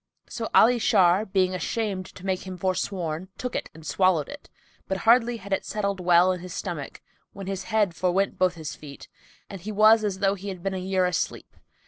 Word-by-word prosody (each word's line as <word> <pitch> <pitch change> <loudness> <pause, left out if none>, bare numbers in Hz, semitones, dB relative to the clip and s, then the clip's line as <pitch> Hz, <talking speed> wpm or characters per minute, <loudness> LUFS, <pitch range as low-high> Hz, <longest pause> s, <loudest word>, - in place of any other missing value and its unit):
So 225 -1 -5
Ali 240 +2 +6
Shar, 195 -1 +3
being 185 -1 +1
ashamed 190 0 -2
to 185 - -11
make 190 -1 -2
him 185 -1 -6
forsworn, 185 -2 -2
took 250 -1 -5
it - - -3
and 160 -1 -13
swallowed 185 -6 +2
it; 290 - -11 0.4
but 190 - -1
hardly 235 +1 +4
had 200 -2 -6
it - - 0
settled 200 -2 -2
well 180 0 +4
in 180 - -3
his 180 0 -8
stomach, 170 -8 -5 0.3
when 195 -1 -8
his 195 0 -4
head 210 -6 +1
forwent 185 +3 0
both 185 -1 +2
his 160 -2 -6
feet 140 -2 -11 0.4
and 195 -3 -9
he 215 +4 -5
was 215 +1 +5
as 200 -3 -1
though 195 0 +2
he 200 0 -8
had 185 -3 -7
been 195 0 -1
a 190 - -3
year 185 0 0
asleep. 180 -2 -3
190 Hz, 205 wpm, -25 LUFS, 180-205 Hz, 0.4 s, Ali